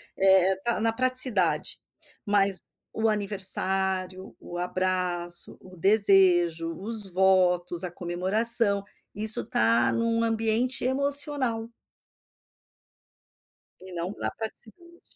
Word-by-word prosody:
É 190 -1 +2 0.2
é - - -5
na 225 +1 -1
praticidade, 255 -7 +1 0.4
mas 200 -2 -2 0.3
o 225 0 -2
aniversário, 190 -2 0
o 175 - -10
abraço, 180 -1 -4
o 185 -1 -17
desejo, 180 -4 +1
os 210 -1 -7
votos, 180 -1 0
a 180 - -5
comemoração, 200 +4 +1 0.3
isso 215 +1 +6
tá 115 +2 0
num 230 0 -2
ambiente 225 +2 -1
emocional. 275 -4 +3 2.1
E 185 0 -15
não 175 +2 -6
na - - -4
praticidade, 340 +10 -12
195 Hz, 95 wpm, -24 LUFS, 180-225 Hz, 2.1 s, isso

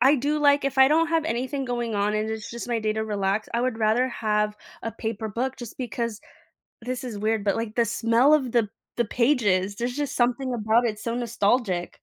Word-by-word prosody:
I 270 +3 +7
do, 290 +4 0
like, 285 -1 +4
if 275 0 -3
I 265 0 +7
don't 325 +3 +3
have 330 -1 +1
anything 265 0 -2
going 240 -2 -2
on 205 +1 +1
and 215 +1 -1
it's 220 -1 -5
just 235 +1 -6
my 235 -2 0
day 215 -1 0
to 220 - -2
relax, 205 -1 -1
I 235 - +1
would 250 -3 -1
rather 225 +4 +2
have 210 -3 0 0.3
a 225 - -4
paper 220 -1 -4
book 250 +5 -2
just 240 -1 -9
because 235 -2 -3 0.6
this 250 +2 -4
is 230 -5 -5
weird, 215 0 0
but, 200 -2 +2
like, 225 -1 -3
the 235 -1 +3
smell 230 +5 +3
of 260 -6 0
the 230 -3 +2 0.3
the 240 - +2
pages, 210 -6 +1
there's 240 +2 -2
just 285 0 -3
something 250 +1 +1
about 225 +1 +2
it, 225 - 0
it's 215 +1 -12
so 230 - -1
nostalgic. 230 -5 0
235 Hz, 225 wpm, -25 LUFS, 215-255 Hz, 0.6 s, I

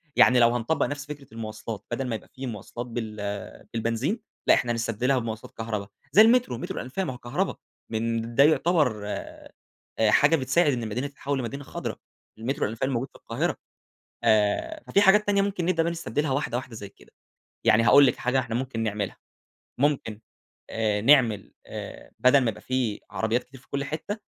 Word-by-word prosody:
يعني 125 -1 +6
لو 120 0 +5
هنطبَّق 120 +7 +1
نفس 145 0 -5
فكرة 145 -2 -9
المواصلات، 110 -1 -6
بدل 130 +2 -2
ما 115 - -1
يبقى 110 - -9
في 135 -1 -6
مواصلات 120 +2 -6
بال 115 -2 -5 0.6
بالبنزين، 115 - -1 0.3
لأ، - - +8
إحنا 120 -1 +1
نستبدلها 115 +3 0
بمواصلات 115 -2 -6
كهربا 110 -3 -3 0.2
زي 210 - +8
المترو، 230 - +4
مترو - - -5
الأنفاق 160 +10 -3
ما 130 - -3
هو - - -9
كهربا 145 +12 -2 0.4
من 115 +1 -2
ده 140 - +7
يعتبر 150 - +3
آآ، - - -7 0.6
حاجة 150 +3 +5
بتساعد 145 +2 +2
إن 120 -2 -2
المدينة 120 +5 -2
تتحوَّل 140 0 -3
لمدينة 130 +3 -4
خضرا. - - -5 0.4
المترو 135 +6 -1
الأنفاق 110 +2 -4
الموجود 130 -1 0
في - - -36
القاهرة. - - -2 0.7
آآ، 110 - +2
ففي 200 - +3
حاجات 205 +1 +5
تانية 200 -1 +3
ممكن 195 -3 -1
نبدأ 175 -2 +2
بقي 170 +1 0
نستبدلها 155 -3 -2
واحدة 130 -3 -1
واحدة 130 -1 -6
زي 105 -2 -7
كده. - - -22 0.5
يعني 110 +1 +6
هاقول 140 +5 +7
لكِ - - +1
حاجة 125 +2 0
إحنا 120 -3 -2
ممكن 125 -2 -2
نعملها، 105 -2 -2 0.6
ممكن 130 -6 0 0.5
آآ، 110 -2 0
نعمل 115 -4 +4
آآ، - - -8
بَدَل 130 +2 +6
ما 125 - +1
يبقى 105 - -11
في 125 -5 -1
عربيات 110 +4 0
كتير 130 0 -15
في - - -26
كل 140 0 -2
حتّة، 160 +9 -4
125 Hz, 180 wpm, -26 LUFS, 115-145 Hz, 0.7 s, لأ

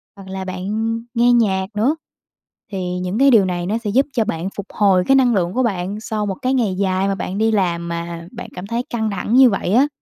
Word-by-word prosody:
hoặc 195 -1 -12
là 190 0 -5
bạn 185 0 -5 0.5
nghe 240 0 +4
nhạc 195 -5 +2
nữa, 240 +9 +2 0.8
thì 180 -2 -3
những 185 +5 -2
cái 275 0 +6
điều 215 -5 +6
này 175 -1 -2
nó 210 +5 0
sẽ 225 -3 -4
giúp 260 +7 +3
cho 230 -5 +1
bạn 180 -3 -3
phục 200 - -5
hồi 195 -3 +3
cái 270 - +5
năng 255 -3 +4
lượng 175 -1 0
của 255 - +1
bạn 200 -2 -2
sau 215 -1 -2
một 195 -2 -2
cái 255 +1 +1
ngày 220 -7 +1
dài 190 0 0
mà 195 - 0
bạn 195 0 -4
đi 220 +1 +2
làm 175 -5 0
mà 170 0 -5
bạn 240 0 -8
cảm 180 +2 -7
thấy 235 +3 -2
căng 220 -2 -1
thẳng 215 +4 -1
như 260 -2 +8
vậy 195 -1 -1
á. 270 +5 +5
200 Hz, 245 wpm, -19 LUFS, 185-235 Hz, 0.8 s, như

